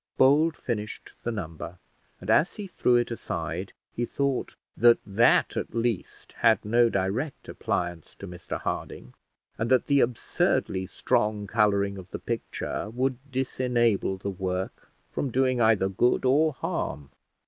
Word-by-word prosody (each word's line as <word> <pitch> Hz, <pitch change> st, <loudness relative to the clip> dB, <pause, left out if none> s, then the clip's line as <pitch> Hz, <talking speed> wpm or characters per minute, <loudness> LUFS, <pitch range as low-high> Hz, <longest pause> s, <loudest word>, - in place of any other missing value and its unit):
Bold 145 Hz, +3 st, +4 dB
finished 105 Hz, -3 st, -5 dB
the 120 Hz, -, -2 dB
number; 85 Hz, -4 st, -6 dB, 0.4 s
and -, -, -2 dB
as 155 Hz, -, +3 dB
he 210 Hz, -, -6 dB
threw 125 Hz, -9 st, +2 dB
it 120 Hz, 0 st, +2 dB
aside, 115 Hz, -, -4 dB, 0.2 s
he 120 Hz, -, -2 dB
thought 140 Hz, +1 st, -1 dB, 0.2 s
that 120 Hz, 0 st, +6 dB
that 105 Hz, +4 st, +3 dB
at -, -, -4 dB
least 115 Hz, -4 st, -2 dB
had 115 Hz, -2 st, +4 dB
no 120 Hz, +2 st, +4 dB
direct 105 Hz, +10 st, -2 dB
appliance 85 Hz, -2 st, -3 dB
to 100 Hz, -, -9 dB
Mr 90 Hz, -1 st, -6 dB
Harding, 60 Hz, -, -5 dB, 0.5 s
and 115 Hz, +1 st, 0 dB
that 130 Hz, -1 st, +4 dB
the 140 Hz, -1 st, +3 dB
absurdly 110 Hz, -5 st, 0 dB
strong 105 Hz, +2 st, 0 dB
colouring 100 Hz, -2 st, +1 dB
of 95 Hz, 0 st, -11 dB
the -, -, -5 dB
picture 115 Hz, -2 st, -4 dB
would 125 Hz, +2 st, -1 dB
disenable 120 Hz, -6 st, +1 dB
the 100 Hz, +1 st, -4 dB
work 95 Hz, 0 st, -4 dB, 0.2 s
from 140 Hz, -, -2 dB
doing 130 Hz, 0 st, +2 dB
either 110 Hz, -4 st, +4 dB
good 110 Hz, +7 st, +1 dB
or 150 Hz, +5 st, +4 dB
harm. 70 Hz, -, -4 dB
115 Hz, 145 wpm, -27 LUFS, 95-130 Hz, 0.5 s, that